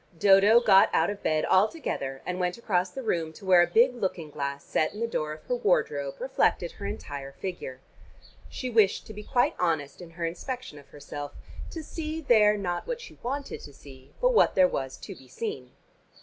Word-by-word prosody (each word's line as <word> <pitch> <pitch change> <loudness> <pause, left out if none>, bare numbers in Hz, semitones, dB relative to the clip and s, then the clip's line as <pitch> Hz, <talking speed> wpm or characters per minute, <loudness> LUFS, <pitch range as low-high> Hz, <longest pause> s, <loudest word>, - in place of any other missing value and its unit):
Dodo 200 +5 +6
got 195 -4 +6
out 165 +5 +3
of 205 0 -8
bed 155 -1 +1
altogether; 185 - 0
and 180 0 -3
went 180 +2 -1
across 185 -6 0
the 265 +7 -7
room 165 -7 -1
to 195 - -13
where 185 -2 +6
a 175 - +3
big 235 +8 +4
looking 185 -9 -3
glass 140 -1 -4
set 155 - -1
in - - -7
the 230 - 0
door 155 -9 -2
of 155 - -12
her - - -3
wardrobe 150 - 0
reflected 255 -9 +1
her 200 - -7
entire 145 -9 -6
figure. 140 -5 -6 0.7
She 255 - -5
wished 220 -5 +3
to 215 - -9
be 210 - -8
quite 245 +3 +1
honest 160 -3 -1
in 175 - -10
her 170 0 -4
inspection 185 - -5
of 140 - -17
herself, 145 0 -8 0.4
to 325 - -7
see 315 0 -5
there 215 -8 +4
not 175 - -3
what - - -3
she 475 - -12
wanted 275 +3 -4
to 145 - -11
see 135 -1 -15
but - - +3
what - - +4
there 275 - +6
was 135 - -4
to - - -9
be 130 - -16
seen. 130 - -5
185 Hz, 205 wpm, -27 LUFS, 150-230 Hz, 0.7 s, Dodo